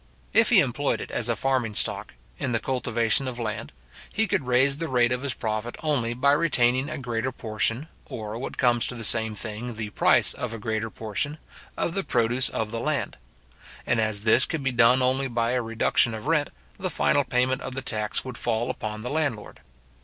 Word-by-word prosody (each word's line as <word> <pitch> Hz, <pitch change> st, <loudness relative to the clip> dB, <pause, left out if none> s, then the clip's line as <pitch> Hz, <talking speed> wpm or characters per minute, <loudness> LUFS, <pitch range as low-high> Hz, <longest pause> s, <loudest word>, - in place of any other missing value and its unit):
If -, -, +5 dB
he -, -, +7 dB
employed -, -, -1 dB
it -, -, -7 dB
as -, -, 0 dB
a -, -, +1 dB
farming 130 Hz, -5 st, -1 dB
stock, -, -, -2 dB, 0.2 s
in 125 Hz, -, -2 dB
the 115 Hz, -, +1 dB
cultivation 125 Hz, 0 st, 0 dB
of 125 Hz, -2 st, -5 dB
land, 110 Hz, -3 st, -4 dB, 0.4 s
he 220 Hz, -, +1 dB
could 185 Hz, -, -1 dB
raise 130 Hz, +3 st, +3 dB
the 165 Hz, -, -2 dB
rate 120 Hz, -3 st, +2 dB
of 125 Hz, 0 st, -1 dB
his 140 Hz, -3 st, -1 dB
profit 110 Hz, +2 st, -3 dB
only 125 Hz, -7 st, 0 dB
by 140 Hz, +3 st, +3 dB
retaining 135 Hz, -4 st, +2 dB
a 155 Hz, -, -4 dB
greater 125 Hz, -1 st, -2 dB
portion, 115 Hz, +4 st, -2 dB, 0.2 s
or, 110 Hz, -1 st, -6 dB
what 135 Hz, -, -6 dB
comes 120 Hz, -3 st, +3 dB
to 125 Hz, -, -5 dB
the 115 Hz, -, -5 dB
same 110 Hz, 0 st, +4 dB
thing, 110 Hz, +2 st, -5 dB
the 105 Hz, -1 st, -5 dB
price -, -, +4 dB
of 120 Hz, -2 st, -5 dB
a -, -, -6 dB
greater 110 Hz, 0 st, -2 dB
portion, 115 Hz, +9 st, -4 dB, 0.4 s
of 170 Hz, -, -1 dB
the 195 Hz, -, -1 dB
produce 120 Hz, -1 st, +1 dB
of 110 Hz, -1 st, -3 dB
the 115 Hz, -, -3 dB
land; 140 Hz, -4 st, -2 dB, 0.7 s
and 120 Hz, -, +1 dB
as 105 Hz, -2 st, 0 dB
this 115 Hz, +4 st, +5 dB
could 160 Hz, -4 st, -3 dB
be 135 Hz, -, +1 dB
done 125 Hz, +1 st, +4 dB
only 130 Hz, +2 st, +1 dB
by 115 Hz, -1 st, 0 dB
a 125 Hz, 0 st, +1 dB
reduction 115 Hz, 0 st, +1 dB
of 110 Hz, -, -8 dB
rent, 150 Hz, -2 st, +1 dB, 0.3 s
the 185 Hz, -1 st, -2 dB
final 145 Hz, -3 st, +2 dB
payment 130 Hz, 0 st, 0 dB
of 130 Hz, -, -6 dB
the 135 Hz, -, -4 dB
tax 105 Hz, -1 st, -2 dB
would 130 Hz, -2 st, -6 dB
fall 120 Hz, 0 st, 0 dB
upon 110 Hz, 0 st, -6 dB
the 125 Hz, -, -2 dB
landlord. 145 Hz, -9 st, -2 dB
125 Hz, 205 wpm, -25 LUFS, 115-135 Hz, 0.7 s, he